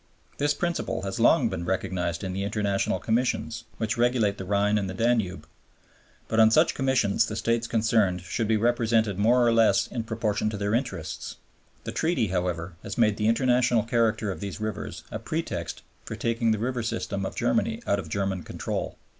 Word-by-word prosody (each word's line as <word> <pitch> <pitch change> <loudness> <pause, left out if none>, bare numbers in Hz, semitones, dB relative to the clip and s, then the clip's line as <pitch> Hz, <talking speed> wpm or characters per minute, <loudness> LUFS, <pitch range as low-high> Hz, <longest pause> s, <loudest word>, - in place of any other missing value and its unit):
This 145 +1 +2
principle 175 -1 -2
has 95 -1 -4
long - - +5
been 85 - -3
recognized 90 -1 -2
in 95 -1 -3
the 95 +1 -2
International 100 -2 0
Commissions 115 +6 -1
which 110 0 -1
regulate 120 -4 +2
the 95 - -5
Rhine 105 +2 +2
and 95 -2 -3
the 95 - -5
Danube. 100 -7 0 0.8
But 110 - 0
on 110 0 +7
such 155 +8 +4
Commissions 130 -7 +2
the 110 - -4
States 115 +1 0
concerned 110 -5 +2
should 110 +5 -2
be 110 0 +3
represented 115 -3 +1
more 120 +4 +4
or 115 - +4
less 115 -1 +4
in 120 - -4
proportion 110 -2 -1
to 105 - -4
their 100 +1 -1
interests. 115 - -3 0.5
The - - -4
Treaty, 150 - 0
however, 90 -1 -2
has 105 - -6
made 110 -3 +3
the 105 - +1
international 125 -1 +3
character 115 -3 +1
of - - -6
these 100 0 -5
rivers 110 -2 -5
a - - -4
pretext - - -4 0.2
for - - -6
taking 115 0 0
the 110 - +2
river 125 +3 -2
system 100 -3 -3
of 95 - -4
Germany 60 - 0
out 100 - +1
of 80 -5 -7
German 95 0 -1
control. - - -4
110 Hz, 185 wpm, -26 LUFS, 100-115 Hz, 0.8 s, on